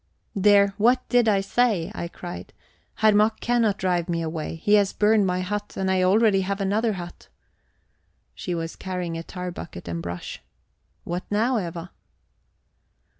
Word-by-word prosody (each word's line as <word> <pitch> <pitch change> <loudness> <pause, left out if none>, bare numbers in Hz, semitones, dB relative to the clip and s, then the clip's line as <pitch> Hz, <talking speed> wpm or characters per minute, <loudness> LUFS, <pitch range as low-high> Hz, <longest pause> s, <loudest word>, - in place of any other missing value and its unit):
"There, 200 0 +5
what 250 +4 +3
did 245 -2 +4
I 200 -2 +3
say?" 205 -4 +1
I 170 - -4
cried. 175 +1 -9 0.4
"Herr 215 0 +4
Mack 215 +1 +3
cannot 230 -4 +1
drive 180 -2 0
me 170 -1 -1
away. 160 0 -4
He 205 +6 0
has 205 -2 +4
burned 210 -1 +3
my 180 0 0
hut, 205 +3 -4
and 190 0 0
I 185 0 +2
already 195 +1 +4
have 195 +1 -2
another 210 +3 +1
hut..." 175 -2 -9 1.1
She 180 - -4
was 165 0 -4
carrying 180 -3 -4
a 165 - -4
tar 180 +1 -6
bucket 160 - -9
and 85 -1 -3
brush. 85 +1 -6 0.6
"What 175 +1 -4
now, 225 +4 +1
Eva?" 170 -1 -6
190 Hz, 160 wpm, -24 LUFS, 175-210 Hz, 1.1 s, There